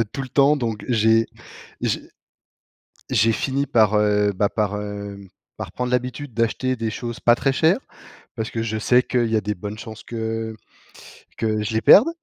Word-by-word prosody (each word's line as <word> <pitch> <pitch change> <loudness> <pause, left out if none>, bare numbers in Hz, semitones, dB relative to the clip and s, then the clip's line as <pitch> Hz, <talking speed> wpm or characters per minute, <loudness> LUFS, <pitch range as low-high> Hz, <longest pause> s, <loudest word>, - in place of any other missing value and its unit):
heu, - - +3
tout 135 - -4
le 130 - -7
temps 140 +3 +4
donc 115 -5 -3
j'ai 115 -1 +3 0.6
j'ai - - 0 1.1
j'ai 115 -3 +3
fini 135 +5 -1
par, 110 -5 +3
heu, 105 -1 +3
bah, 100 +1 +1
par, 105 -1 -1
hem, 100 -1 -7 0.3
par - - -6
prendre 125 0 -3
l'habitude 125 +2 -2
d'acheter 115 +3 0
des 115 -2 -2
choses 120 +1 -5
pas 120 0 +5
très 135 +1 0
chères 165 - +3 0.6
parce 110 -1 -3
que 115 - -3
je 110 -1 -2
sais 125 +3 +4
qu'il 120 -2 0
y 110 - +2
a - - +2
des 105 +1 -3
bonnes 105 +3 -7
chances 110 -1 -9
que 115 -1 -4 0.8
que 110 -1 -1
je 105 +1 -3
les 110 - +2
perde. 210 - +8
115 Hz, 185 wpm, -22 LUFS, 105-125 Hz, 1.1 s, perde